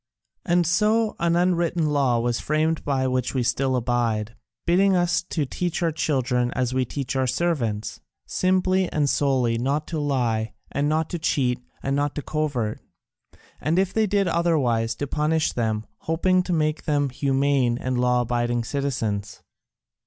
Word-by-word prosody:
And 175 -1 +2
so 215 +6 +2
an 170 0 +2
unwritten 175 -2 +1
law 140 -5 +2
was 120 0 0
framed 155 +1 0
by 135 -2 0
which 130 0 -1
we 130 - +1
still 130 +2 +1
abide, 115 -3 -1 0.3
bidding 190 +3 +4
us 175 -1 +2
teach 170 +3 -2
our 165 - +2
children 125 -5 0
as 130 -1 -1
we 130 0 +1
teach 135 +2 -4
our 130 -1 +1
servants, 120 -9 -1 0.3
simply 185 0 +1
and 150 -2 +1
solely 130 -5 +1
not 140 +5 0
to 160 - -2
lie, 120 -6 0 0.2
and 145 +1 0
not 160 +1 +1
to 175 - -3
cheat, 130 -6 0 0.2
and 135 0 0
not 145 0 -1
to 150 - -4
covert, 140 -9 -2 0.8
and 160 +3 0
if 190 0 +1
they 220 -1 +2
did 200 -1 +1
otherwise 135 -10 +1
to 145 - -3
punish 155 +2 0
them, 110 -2 -1
hoping 185 +3 +1
to 180 - -4
make 155 -2 0
them 145 -2 +1
humane 135 -2 +1
and 125 0 -2
law 125 0 +3
abiding 120 0 0
citizens. 115 -7 -3
140 Hz, 160 wpm, -24 LUFS, 125-165 Hz, 0.8 s, bidding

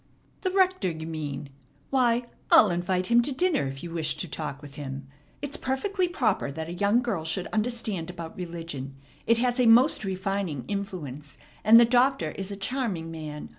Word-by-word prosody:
"The 375 - 0
rector, 370 - +2
you 160 -1 -6
mean? 150 -3 -5 0.4
Why, 245 -2 +3 0.3
I'll 210 -4 +7
invite 180 +1 0
him 235 +4 +5
to 280 - -1
dinner 300 - +1
if 135 0 -6
you 170 - -6
wish 165 -2 0
to 180 - -3
talk 150 -2 -5
with 145 -1 -12
him. 135 -1 -6 0.4
It's 285 +2 -3
perfectly 360 +9 -1
proper 225 - 0
that 160 +2 -5
a 170 - -5
young 205 +6 +2
girl 205 -9 -2
should 175 +3 -2
understand 215 -6 -2
about 170 -2 -7
religion. 165 -6 -6 0.3
It 230 - +5
has 245 +1 +1
a 245 - +4
most 235 +2 +5
refining 190 - -2
influence, 150 -9 -5 0.3
and 225 +2 +9
the 235 - +7
Doctor 255 +3 +2
is 195 0 -5
a 200 - -4
charming 200 -6 -2
man. 155 -2 -7
190 Hz, 180 wpm, -27 LUFS, 160-240 Hz, 0.4 s, and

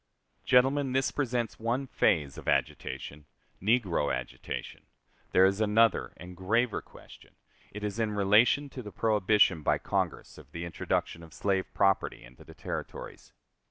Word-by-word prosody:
Gentlemen, 135 +1 +3
this 135 0 +1
presents 120 -5 -2
one 120 +4 -1
phase 75 - +1
of - - -11
agitation 75 +1 -2 0.3
negro 95 - +1
agitation: 60 -1 -6 0.4
there 95 - +6
is 95 +2 +1
another 110 +1 +3
and 90 +1 -10
graver 110 +5 0
question, - - -17 0.4
it 105 +1 -8
is 105 +2 -3
in 110 -2 0
relation 105 +8 +4
to 125 - -7
the 105 -3 -9
prohibition 105 -5 +3
by - - +2
Congress - - -3
of - - -17
the 85 +1 -5
introduction 85 0 -2
of 80 -1 -14
slave 95 -2 -1
property 95 -1 +1
into - - -15
the - - -14
Territories. - - -7
105 Hz, 145 wpm, -29 LUFS, 90-120 Hz, 0.4 s, there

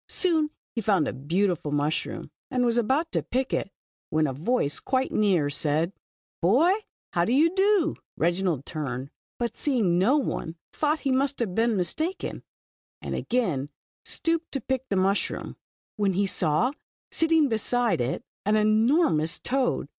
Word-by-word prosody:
Soon 320 -5 +1 0.2
he 230 - -2
found 195 -8 +2
a - - -2
beautiful 165 +3 -1
mushroom, 145 +2 -2 0.2
and 250 -2 +1
was 240 0 +2
about 275 +8 +1
to - - +1
pick 260 +1 -2
it, - - -1 0.4
when 155 0 +2
a 135 - -1
voice 150 - 0
quite 260 0 0
near, 190 -8 +2
said: 150 +5 0 0.2
" - - -90
Boy, 260 - +4 0.4
how 170 - +2
do 200 - 0
you 315 +6 +4
do? 385 -4 +3
" - - -76
Reginald 170 -4 0
turned, 135 -4 -4 0.3
but 235 -2 -2
seeing 215 - +1
no 245 +11 +4
one 170 - -2 0.2
thought 305 +1 0
he 275 - 0
must 275 +2 +1
have 220 -7 -2
been 225 +1 +2
mistaken, 315 - -1 0.6
and - - -5
again 175 - -1 0.3
stooped 330 0 -2
to 275 - -1
pick 260 +2 -3
the 200 - 0
mushroom, 195 +2 0 0.4
when 200 -2 +1
he 200 +3 +1
saw, 180 - +1 0.4
sitting 325 -2 +3
beside 235 - +1
it, 120 +3 -2 0.2
an 210 +2 +2
enormous 215 - +3
toad. 260 0 0
215 Hz, 160 wpm, -26 LUFS, 170-265 Hz, 0.6 s, Boy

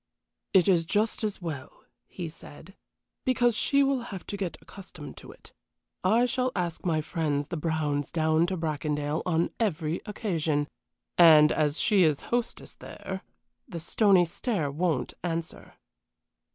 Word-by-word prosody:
"It 185 -4 +5
is 170 -4 +3
just 215 +3 0
as 205 -3 -3
well," 145 -5 -7 0.2
he 175 -3 -6
said, 160 +3 -13 0.5
"because 245 -3 +2
she 280 +4 +3
will 270 -2 +1
have 190 -3 -7
to - - -5
get 190 -4 -4
accustomed 180 -6 -11
to - - -11
it. - - -17 0.5
I 225 +6 +4
shall 255 +1 0
ask 175 -3 -2
my 160 -3 +1
friends 150 -3 -2
the 170 - -3
Browns 150 -3 -1
down 160 0 +2
to 185 0 -2
Bracondale 150 -1 -2
on 165 -1 +1
every 170 -7 -1
occasion, 160 -9 -1 0.5
and 155 -3 +8
as 150 0 +1
she 210 -5 +3
is 155 -5 +3
hostess 240 -1 -2
there 190 0 -8 0.5
the 170 - -6
stony 185 +2 +4
stare 170 - -2
won't 155 -3 -1
answer." 165 -2 -4
170 Hz, 145 wpm, -28 LUFS, 155-200 Hz, 0.5 s, and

